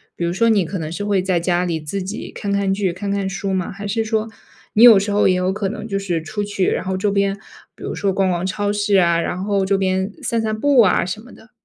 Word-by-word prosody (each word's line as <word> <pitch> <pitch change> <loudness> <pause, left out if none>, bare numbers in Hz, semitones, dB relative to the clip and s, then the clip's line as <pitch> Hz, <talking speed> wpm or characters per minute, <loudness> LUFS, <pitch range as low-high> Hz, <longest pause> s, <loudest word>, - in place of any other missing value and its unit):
比 170 - -2
如 170 - -1
说 230 +4 +2
你 200 -5 +3
可 190 +4 -4
能 155 0 -5
是 205 +4 -4
会 200 -3 +1
在 185 -2 0
家 175 +1 0
里 170 -3 -2
自 185 +6 -4
己 205 +4 -6
看 200 -1 -4
看 200 -1 +1
剧、 195 -3 0
看 195 +3 -5
看 200 -1 -1
书 195 0 -3
吗？ 185 -2 -2
还 200 +1 -7
是 225 +2 0
说 220 0 -1 0.4
你 220 - +5
有 235 -4 +10
时 205 +1 -2
候 205 -1 +3
也 185 - +3
有 185 +1 0
可 195 -2 -2
能 220 - -6
就 195 - -2
是 175 -4 -2
出 205 +6 -4
去， 200 -2 -1
然 - - -1
后 190 0 -2
周 205 +2 0
边 200 0 0 0.4
比 - - -13
如 - - -4
说 200 -1 0
逛 190 0 +1
逛 175 0 -2
超 205 +2 -1
市 205 -1 +1
啊， 170 -2 +3
然 180 +2 -3
后 200 -1 0
周 195 0 +1
边 190 +1 0
散 230 -1 0
散 215 0 -2
步 280 -3 +5
啊 185 -3 +3
什 185 +4 -5
么 245 - -15
的？ 240 - -18
195 Hz, 300 characters per minute, -20 LUFS, 185-205 Hz, 0.4 s, 有